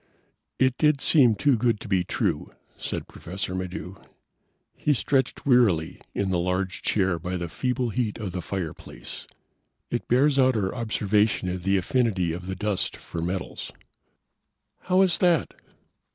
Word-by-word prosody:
"It 130 -1 +2
did 150 -2 +4
seem 130 -7 +5
too 140 +4 +3
good 115 -2 +1
to - - -8
be 95 -3 +2
true," - - -2 0.2
said - - -5
Professor 90 +1 -6
Maddox. 95 +1 -5 0.8
He 150 - +1
stretched 130 +5 0
wearily 115 - +3
in 100 -1 0
the 90 - +1
large 90 +1 -1
chair 95 -4 +1
by 90 +3 -3
the 85 -1 -3
feeble 125 +6 -1
heat 115 -2 -1
of 105 -5 -4
the 90 0 -4
fireplace. 90 -4 -6 0.6
"It - - -2
bears 135 +3 +3
out 130 -1 +4
our 95 -3 0
observation 105 -4 +1
of 90 0 -3
the 95 +2 +2
affinity 95 -4 +1
of 90 +2 -7
the 95 - -3
dust 105 -2 -2
for 85 - -6
metals." 90 +2 -4 1.2
"How 185 +1 +5
is 185 -2 +1
that?" 175 -6 +2
100 Hz, 150 wpm, -26 LUFS, 90-125 Hz, 1.2 s, seem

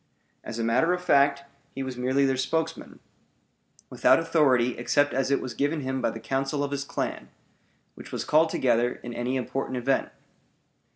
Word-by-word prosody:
As 115 - -6
a 115 - -1
matter 125 +10 +2
of 180 0 -3
fact, 140 -3 +3 0.3
he 135 - -3
was 130 -1 -5
merely 130 +3 +1
their 135 -1 +1
spokesman, 160 +5 -3 0.9
without - - +4
authority 145 -7 +2
except 145 +4 +2
as 135 0 0
it 140 - +2
was 125 - -6
given 145 +5 -1
him 130 0 -3
by - - +1
the 115 - -7
council 135 +3 -2
of 140 - -3
his 140 -1 -2
clan, - - -4 0.6
which - - -12
was - - -4
called 160 +2 +4
together 120 -4 +1
in 120 - -6
any 120 +2 -2
important 130 0 -3
event. 135 +2 0
135 Hz, 175 wpm, -26 LUFS, 125-145 Hz, 0.9 s, without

